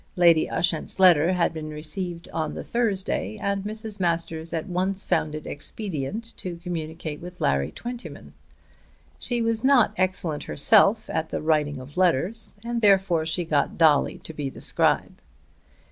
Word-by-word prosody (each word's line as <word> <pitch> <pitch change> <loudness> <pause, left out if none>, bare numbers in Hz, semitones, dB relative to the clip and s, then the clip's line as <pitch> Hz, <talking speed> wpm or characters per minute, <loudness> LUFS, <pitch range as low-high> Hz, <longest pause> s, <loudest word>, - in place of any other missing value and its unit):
Lady 170 -3 +5
Ushant's 170 +1 -1
letter 175 -2 +6
had 175 -2 +1
been 155 -1 -6
received 170 +3 -3
on 160 -1 -3
the - - -5
Thursday 215 -2 -1
and 200 -1 -1
Mrs. 215 0 -5
Masters 165 -2 -1
at 165 -2 -2
once 190 +2 -1
found 155 -1 0
it 155 - -7
expedient 200 +6 -5
to 180 -2 -5
communicate 160 -3 -5
with 180 +1 -9
Larry 70 +2 +1
Twentyman. 245 - -8 0.9
She 240 -2 -2
was 230 0 0
not 260 -6 +4
excellent 185 -5 -1
herself 215 +6 +4
at 160 0 -2
the - - -3
writing 150 -2 +1
of 135 +6 -12
letters, 185 +6 +1
and 235 0 -2
therefore 190 -6 +3
she 170 +2 -1
got 150 -3 0
Dolly 155 -4 +4
to 160 - -9
be 145 -3 -3
the - - -12
scribe. - - +1
175 Hz, 155 wpm, -25 LUFS, 155-200 Hz, 0.9 s, letter